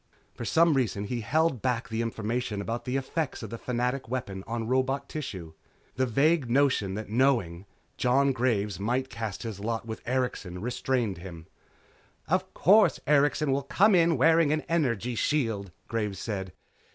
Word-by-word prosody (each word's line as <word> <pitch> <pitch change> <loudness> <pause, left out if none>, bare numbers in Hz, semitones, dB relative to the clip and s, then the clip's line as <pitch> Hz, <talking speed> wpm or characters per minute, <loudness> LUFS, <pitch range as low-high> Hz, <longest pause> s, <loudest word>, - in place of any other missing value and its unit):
For 120 - -7
some 165 +8 +4
reason 115 -7 0
he 120 +3 -3
held 155 +1 +1
back 125 -2 -1
the 110 0 -1
information 115 -1 -2
about 115 +4 -4
the 125 - -2
effect 135 +1 -2
of 110 - -7
the 115 - -6
Fanatic 125 +1 -2
weapon 100 -7 -4
on 115 -1 -3
robot 130 +2 0
tissue. 95 - -6 0.4
The 130 +1 +1
vague 140 +3 +2
notion 125 -7 +2
that 110 0 -6
knowing, 110 -8 +1 0.3
Jon 135 +3 +3
Graves 110 -7 0
might 125 +6 -1
cast 115 -3 -5
his 110 -4 -5
lot 115 +2 -3
with 110 -1 -6
Erikson, 125 -8 -2
restrained 120 -3 -1
him. 85 -3 -9 0.8
"Of 185 +3 0
course, 195 -6 +5
Erikson 145 0 +3
will 135 +1 +1
come 195 +10 +3
in 170 -3 +4
wearing 160 +2 +4
an 155 0 +1
energy 125 - 0
shield," 115 -7 -1 0.2
Graves 105 -4 -2
said. 95 -3 -4
125 Hz, 160 wpm, -28 LUFS, 110-140 Hz, 0.8 s, course